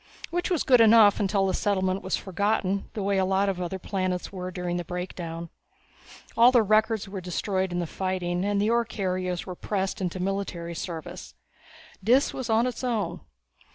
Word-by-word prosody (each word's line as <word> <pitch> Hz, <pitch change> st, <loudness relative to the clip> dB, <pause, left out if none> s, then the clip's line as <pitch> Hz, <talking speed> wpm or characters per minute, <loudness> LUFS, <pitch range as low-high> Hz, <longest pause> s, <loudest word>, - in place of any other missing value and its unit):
Which 350 Hz, +1 st, -1 dB
was 355 Hz, -5 st, +1 dB
good 250 Hz, -3 st, +5 dB
enough 220 Hz, -2 st, +7 dB
until 195 Hz, -1 st, +1 dB
the 190 Hz, -, 0 dB
settlement 190 Hz, -1 st, 0 dB
was 190 Hz, 0 st, -1 dB
forgotten, 200 Hz, +1 st, -1 dB
the 210 Hz, -, -2 dB
way 200 Hz, 0 st, +1 dB
a -, -, +3 dB
lot 190 Hz, +1 st, +2 dB
of 185 Hz, -2 st, -3 dB
other 180 Hz, +2 st, -3 dB
planets 185 Hz, -1 st, -2 dB
were 185 Hz, -1 st, -5 dB
during 180 Hz, -1 st, -3 dB
the 175 Hz, -, -3 dB
Breakdown. 170 Hz, -1 st, -6 dB, 0.8 s
All 240 Hz, +2 st, +7 dB
the 240 Hz, -3 st, +5 dB
records 215 Hz, 0 st, +2 dB
were 195 Hz, -1 st, -6 dB
destroyed 185 Hz, +1 st, -2 dB
in 175 Hz, -, -2 dB
the 175 Hz, -, -1 dB
fighting, 180 Hz, 0 st, -2 dB
and 205 Hz, 0 st, +1 dB
the 210 Hz, +3 st, +2 dB
ore 235 Hz, 0 st, +3 dB
carriers 185 Hz, -5 st, -3 dB
were 185 Hz, -, -5 dB
pressed 195 Hz, +1 st, -3 dB
into 185 Hz, 0 st, -2 dB
military 185 Hz, -3 st, -3 dB
service. 165 Hz, -2 st, -7 dB, 0.7 s
Dis 250 Hz, +7 st, +3 dB
was 255 Hz, -3 st, -5 dB
on 225 Hz, +2 st, +3 dB
its 250 Hz, 0 st, -4 dB
own. 215 Hz, -9 st, -1 dB
190 Hz, 185 wpm, -26 LUFS, 180-215 Hz, 0.8 s, enough